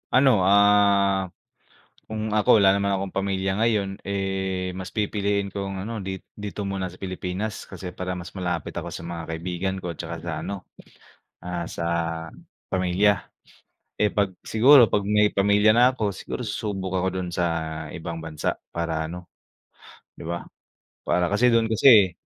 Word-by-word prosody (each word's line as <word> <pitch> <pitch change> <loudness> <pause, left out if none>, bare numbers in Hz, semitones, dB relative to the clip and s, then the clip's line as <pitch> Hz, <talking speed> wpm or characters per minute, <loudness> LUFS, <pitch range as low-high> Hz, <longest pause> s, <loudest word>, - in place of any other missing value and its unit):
Ano, 125 -5 +5
ah, 100 -1 +4 0.8
kung 110 0 -3
ako 105 +1 +5
wala 95 - +7
naman 100 0 +1
akong 95 0 -3
pamilya 95 0 -1
ngayon, 105 -4 +1
eh, 95 -2 -2
mas 95 -1 -8
pipiliin 100 -1 0
kong, 95 -1 -4
ano, 115 +1 -4
dit 95 -1 -5 0.2
dito 105 0 -5
muna 95 -1 -2
sa 90 - -11
Pilipinas. 95 +3 -5
Kasi 90 -2 -7
para 90 0 -4
mas 90 -1 -8
malapit 90 -4 -3
ako - - -6
sa 85 - -7
mga 85 -1 -6
kaibigan 90 +3 -3
ko, 90 - -3
at 85 - -12
saka - - -5
sa - - -3
ano, 100 -2 -5 0.8
ah, 85 -1 -4
sa - - -6 0.9
pamilya. 95 +3 +2 0.8
Eh, 105 - +4
'pag 100 -2 0
siguro 125 +2 +6
'pag 100 -1 0
may 105 0 +4
pamilya 105 +2 +3
na 120 +4 +5
ako, 110 -5 -1
siguro 100 - -6
susubok 95 -3 -3
ako 95 0 -1
do'n 90 - -4
sa 85 0 0 0.5
ibang 85 0 -5
bansa 75 -2 -2 0.2
para 80 -2 -2
ano, 90 +2 -8 0.8
'di - - -14
ba? 85 0 -4 0.6
Para 90 +1 +2
kasi 115 +5 +4
do'n 115 -1 +2
kasi 110 -5 +7
95 Hz, 155 wpm, -24 LUFS, 90-105 Hz, 0.9 s, wala